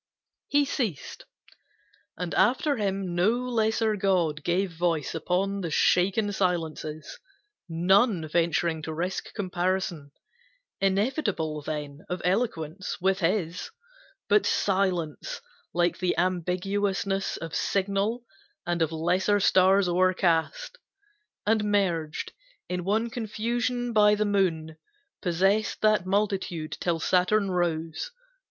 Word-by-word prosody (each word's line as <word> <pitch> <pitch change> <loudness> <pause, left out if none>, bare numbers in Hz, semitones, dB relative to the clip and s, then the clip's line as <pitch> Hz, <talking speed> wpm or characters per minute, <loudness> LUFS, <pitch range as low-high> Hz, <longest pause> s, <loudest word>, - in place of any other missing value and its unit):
He 290 0 +3
ceased, 235 - -3 0.9
and 180 0 -4
after 260 +8 +2
him 195 -3 -2
no 175 +4 +3
lesser 225 -3 0
god 180 -7 +1
Gave 180 +3 0
voice 165 -2 -1
upon 190 +4 -1
the 170 - -3
shaken 195 +6 +2
silences, 160 -5 -2 0.5
None 180 +1 +3
venturing 165 0 +1
to 160 0 -5
risk 180 +4 -3
comparison, 180 -5 -2 0.7
Inevitable 195 - 0
then, 145 -1 -5
of 180 - -2
eloquence 185 -4 -1
With 190 +1 +1
his; 180 -1 -1 0.6
but 425 - +4
silence 185 -6 0 0.3
like 175 0 +1
the 180 -1 +1
ambiguousness 190 +2 -1
Of 165 -1 -7
signal 200 +5 0 0.4
and 175 -1 -1
of 160 -1 +1
lesser 180 +5 +1
stars 190 0 +4
o'ercast 185 - +1 0.7
And 215 0 +2
merged 175 -7 0 0.3
in 180 0 -3
one 220 +5 0
confusion 240 +1 -2
by 210 -1 +5
the 215 +1 0
moon, 165 -6 0 0.4
Possessed 195 +4 +1
that 215 -4 +3
multitude, 190 -5 -1
till 170 -2 0
Saturn 190 +4 +2
rose. 165 - -1
185 Hz, 105 wpm, -27 LUFS, 170-205 Hz, 0.9 s, by